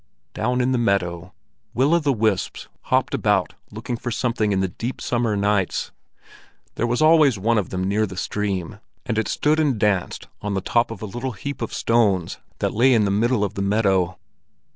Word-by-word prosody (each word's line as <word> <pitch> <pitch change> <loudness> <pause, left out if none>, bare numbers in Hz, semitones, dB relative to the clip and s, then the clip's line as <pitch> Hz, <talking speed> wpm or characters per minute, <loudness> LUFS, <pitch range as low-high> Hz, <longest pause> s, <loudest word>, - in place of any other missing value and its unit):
Down 125 +3 0
in 125 +1 +1
the 125 - +1
meadow, 95 -5 -1 0.4
will 135 +6 +3
o' 170 - +5
the 145 -3 +1
wisps 110 -5 -1 0.2
hopped - - +1
about - - +1 0.2
looking 115 +3 -5
for 120 - -5
something 115 -2 0
in 95 - +1
the 95 - +1
deep 115 +8 -5
summer 115 -4 0
nights. 100 -2 0 0.8
There 120 - -1
was 120 +5 +1
always 155 -6 +5
one 110 +3 +2
of 100 - -4
them 95 0 -3
near 105 +3 +1
the 95 - -9
stream, 100 0 -3 0.3
and 115 -3 -1
it 110 - -1
stood 155 +1 +1
and 145 -6 +2
danced 100 -4 0
on 105 -1 -2
the - - +1
top 120 +4 +1
of 115 -2 -8
a - - -2
little 120 +5 -4
heap 140 +7 -6
of 115 - -3
stones 105 -7 +1 0.2
that - - -1
lay 125 +3 +4
in 110 -2 +3
the 100 - 0
middle 110 +2 +1
of 100 - -2
the 100 - -4
meadow. 95 -3 +1
110 Hz, 200 wpm, -22 LUFS, 100-120 Hz, 0.8 s, o